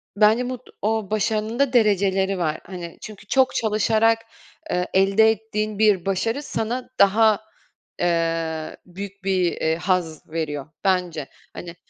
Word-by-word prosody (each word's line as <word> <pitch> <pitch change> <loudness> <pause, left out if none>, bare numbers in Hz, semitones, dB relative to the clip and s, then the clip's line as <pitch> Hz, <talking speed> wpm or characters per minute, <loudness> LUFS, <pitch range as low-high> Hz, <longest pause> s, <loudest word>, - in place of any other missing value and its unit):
bence 220 +4 +3
bud 255 -1 -4 0.2
o 215 -1 -1
başarının 215 +2 -1
da 280 -2 +2
dereceleri 195 -4 +2
var, 155 -3 -1
hani. 175 -2 -8
Çünkü 210 -1 -10
çok 260 +3 +2
çalışarak, 220 +1 +2 0.5
eee, 180 0 0
elde 195 +4 +5
ettiğin 215 -1 -3
bir 210 -5 +3
başarı 225 +8 -1
sana 245 -1 -3
daha, 215 +1 +5 0.6
eee, 165 -2 -1
büyük 195 +2 -9
bir, 185 -3 +1
eee, 160 0 0
haz 170 -3 -2
veriyor, 150 -3 -3 0.2
bence. 180 -6 0 0.3
Hani, 170 -1 -8
195 Hz, 130 wpm, -23 LUFS, 175-220 Hz, 0.6 s, elde